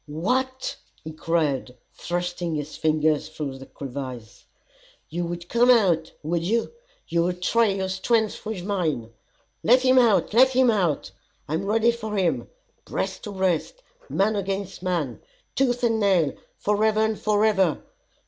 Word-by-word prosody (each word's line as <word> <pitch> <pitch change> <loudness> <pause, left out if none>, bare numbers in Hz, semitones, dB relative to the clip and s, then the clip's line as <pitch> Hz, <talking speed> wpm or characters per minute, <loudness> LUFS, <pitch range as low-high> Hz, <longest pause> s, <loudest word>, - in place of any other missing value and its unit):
"What!" 255 - -1 0.3
he 160 - -6
cried, 150 -6 -1 0.2
thrusting 175 -1 -3
his 150 0 -5
fingers 155 -1 +1
through 145 -4 -5
the 135 - -11
crevice, 130 -4 -8 0.6
"you 170 +2 -3
would 170 0 -6
come 235 +5 +3
out, 180 -10 +4
would 165 +2 -1
you, 225 - 0 0.4
you 170 - +1
would 180 +1 -2
try 230 +4 +3
your 195 -1 -1
strength 215 +4 0
with 215 -5 -5
mine. 155 - -1 0.5
Let 250 +3 +4
him 260 0 +5
out, 225 -4 +3
let 260 +3 +6
him 255 -2 +5
out! 180 -9 0 0.4
I 150 - -4
am 170 +5 -1
ready 225 +3 +3
for 220 -3 -5
him, 185 -3 0 0.3
breast - - -4
to 210 - -5
breast, 190 - -1 0.3
man 210 +3 +1
against 195 -1 -3
man, 170 -10 -2 0.3
tooth 245 -2 +1
and 225 -2 +2
nail, 185 -9 +3 0.2
forever 215 +1 +2
and 220 -1 0
forever. 210 -2 +2
190 Hz, 150 wpm, -24 LUFS, 160-220 Hz, 0.6 s, let